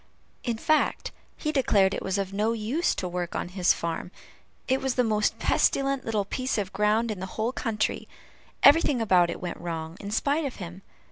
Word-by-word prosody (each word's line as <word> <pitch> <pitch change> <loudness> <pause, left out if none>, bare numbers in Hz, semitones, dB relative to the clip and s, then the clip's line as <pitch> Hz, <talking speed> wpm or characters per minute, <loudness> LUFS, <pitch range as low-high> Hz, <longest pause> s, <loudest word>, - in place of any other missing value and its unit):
In 235 -3 -1
fact, 310 +7 +1 0.3
he 305 - -2
declared 205 -9 +3
it - - -3
was 190 +1 -1
of 195 -1 -3
no 215 +3 +1
use 230 +10 0
to 185 - -3
work 175 -1 -4
on - - -3
his 180 -1 +2
farm; 170 +1 -2 0.6
it 260 0 +1
was 265 -2 -1
the 250 - +3
most 215 -2 +1
pestilent 275 -1 +1
little 215 -3 0
piece 255 +5 -2
of 200 -2 -3
ground 215 +2 +2
in 205 - -5
the 190 - -4
whole 225 +2 0
country; 225 -4 -2 0.6
everything 285 -3 +6
about 185 -6 +4
it - - -4
went 175 - -5
wrong, 165 -1 -5
in 200 - -6
spite 285 +9 +1
of 270 - -4
him. 180 0 -8
215 Hz, 195 wpm, -27 LUFS, 185-255 Hz, 0.6 s, everything